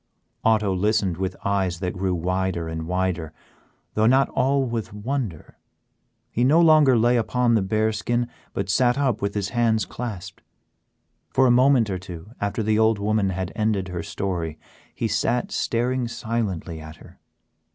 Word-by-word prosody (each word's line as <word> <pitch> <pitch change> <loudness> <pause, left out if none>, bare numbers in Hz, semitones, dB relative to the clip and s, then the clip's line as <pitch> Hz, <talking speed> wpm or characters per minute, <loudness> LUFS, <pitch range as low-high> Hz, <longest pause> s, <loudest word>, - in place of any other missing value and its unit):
Otto 105 -3 +3
listened 100 -2 +1
with 95 0 -2
eyes 95 -3 0
that 90 -1 -2
grew 95 0 -1
wider 90 0 -1
and 80 0 -5
wider, 90 -3 -1 0.6
though 110 +1 +3
not 135 +3 +4
all 135 +1 +1
with 115 -3 -4
wonder; 105 - -4 0.7
he 120 - 0
no 145 +6 +5
longer 155 -6 +6
lay 120 +2 +3
upon 120 +1 +1
the 110 - +3
bear 110 +3 +1
skin, 120 +3 -1 0.2
but 100 - -3
sat 120 +6 +2
up 135 -6 0
with 100 +1 -2
his 100 -1 -1
hands 115 -3 +1
clasped. 95 -6 -7 0.9
For 130 - +3
a 125 - +5
moment 125 -3 +4
or 95 - -2
two 90 +1 -10
after 100 +2 -1
the 110 0 +2
old 110 -1 +4
woman 105 -1 +1
had 95 0 -3
ended 105 -4 0
her 90 -1 -4
story, 85 -2 -3 0.4
he 115 - -1
sat 110 +3 0
staring 125 +1 0
silently 110 -9 -3
at 80 0 -10
her. - - -17
105 Hz, 160 wpm, -24 LUFS, 95-120 Hz, 0.9 s, longer